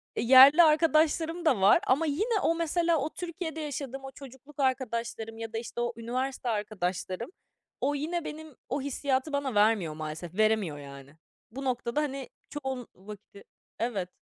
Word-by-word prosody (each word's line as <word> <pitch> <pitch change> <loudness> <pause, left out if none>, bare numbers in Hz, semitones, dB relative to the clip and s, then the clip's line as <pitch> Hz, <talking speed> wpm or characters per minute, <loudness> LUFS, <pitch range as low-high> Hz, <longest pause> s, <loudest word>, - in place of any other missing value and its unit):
e, - - -1
yerli 265 +7 +9
arkadaşlarım 320 +2 +2
da 255 -11 +3
var 195 - +6
ama 280 +6 +3
yine 410 +10 0
o, 330 - +2
mesela, 335 0 +1
o 290 +1 -1
Türkiye'de 340 -2 -5
yaşadığım 275 -2 -5
o 270 - -7
çocukluk 275 +2 -14
arkadaşlarım 235 -4 -2
ya 225 0 -7
da - - -2
işte 235 +1 -5
o 240 0 -1
üniversite 255 +2 -3
arkadaşlarım, 205 - -3 0.5
o 285 +2 +1
yine 325 +4 -2
benim 310 -2 -8
o 275 +3 -1
hissiyatı 280 +1 -1
bana 280 -4 -1
vermiyor 205 -6 +3
maalesef. 155 +2 -6
Veremiyor, 215 -8 +2
yani. 140 0 -11 0.4
Bu 270 +4 -7
noktada, 245 +2 -1
hani, 275 -3 -4 0.2
çoğun 265 -4 -5
vakti 200 +1 -12 0.4
Evet. 205 -6 -2
260 Hz, 155 wpm, -28 LUFS, 220-300 Hz, 0.5 s, yerli